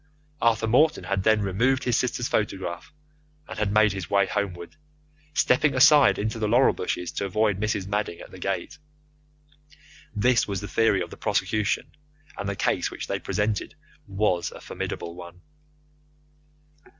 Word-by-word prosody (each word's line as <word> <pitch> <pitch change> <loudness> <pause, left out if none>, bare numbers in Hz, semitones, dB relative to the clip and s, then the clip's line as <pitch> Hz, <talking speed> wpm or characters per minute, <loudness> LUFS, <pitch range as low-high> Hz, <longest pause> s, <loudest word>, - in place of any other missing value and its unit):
Arthur 115 -1 +2
Morton 150 +8 +3
had 100 -1 -1
then 110 +1 +3
removed 125 +8 +1
his 125 - +1
sister's 125 -1 -1
photograph, 95 -4 -3 0.6
and - - -7
had 105 -2 0
made 110 0 +4
his 95 -4 -6
way 100 -1 +3
homeward, 95 - -4 0.6
stepping 135 +3 +3
aside 145 +2 +6
into 110 +2 -3
the 110 - 0
laurel 120 +5 +4
bushes 90 -1 -3
to 100 - -3
avoid 105 0 0
Mrs. 105 -3 -1
Madding 100 -3 -2
at - - -12
the - - -11
gate. - - -4 1.4
This 120 +3 +2
was 100 -2 -3
the 100 - -6
theory 105 -1 +2
of 85 - -10
the - - -10
prosecution, 105 -1 -1 0.4
and 100 - -4
the 100 - -3
case - - 0
which - - -6
they - - -3
presented 105 0 -2 0.3
was 95 -4 0
a - - -11
formidable 85 - -6
one. 90 0 -12
105 Hz, 155 wpm, -25 LUFS, 95-115 Hz, 1.4 s, aside